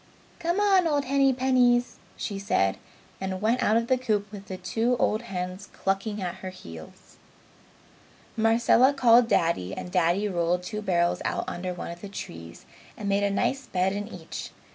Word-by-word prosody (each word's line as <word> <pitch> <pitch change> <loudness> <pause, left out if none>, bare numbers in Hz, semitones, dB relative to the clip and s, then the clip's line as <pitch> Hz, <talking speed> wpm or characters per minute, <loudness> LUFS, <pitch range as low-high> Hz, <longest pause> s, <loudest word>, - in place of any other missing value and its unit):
"Come 345 +3 0
on, 390 -4 +4
old 290 -3 +1
Hennypennies!" 255 -2 +3 0.2
she 200 -3 -4
said, 95 - +1 0.4
and 190 -1 -3
went 225 +5 +1
out 215 - +3
of 230 - +1
the 255 +1 +1
coop 210 -5 -1
with 200 -1 -10
the 185 - -5
two 225 +7 0
old 215 -1 +1
hens 185 -2 -5
clucking 195 +2 -2
at 175 -1 -4
her 185 - -5
heels. 85 - -12 1.2
Marcella 230 +4 +4
called 240 -3 +5
Daddy 130 - +1
and 180 - -6
Daddy 180 +3 +2
rolled 175 -1 0
two 210 +3 -5
barrels 175 -4 +1
out - - -1
under 180 +1 -4
one 175 -1 -6
of 170 0 -10
the 200 - -7
trees 85 - -9 0.3
and 205 - -3
made 200 0 +2
a 200 - +2
nice 265 +7 -1
bed 185 +1 0
in 205 +1 -4
each. 180 -7 -7
205 Hz, 170 wpm, -26 LUFS, 180-240 Hz, 1.2 s, called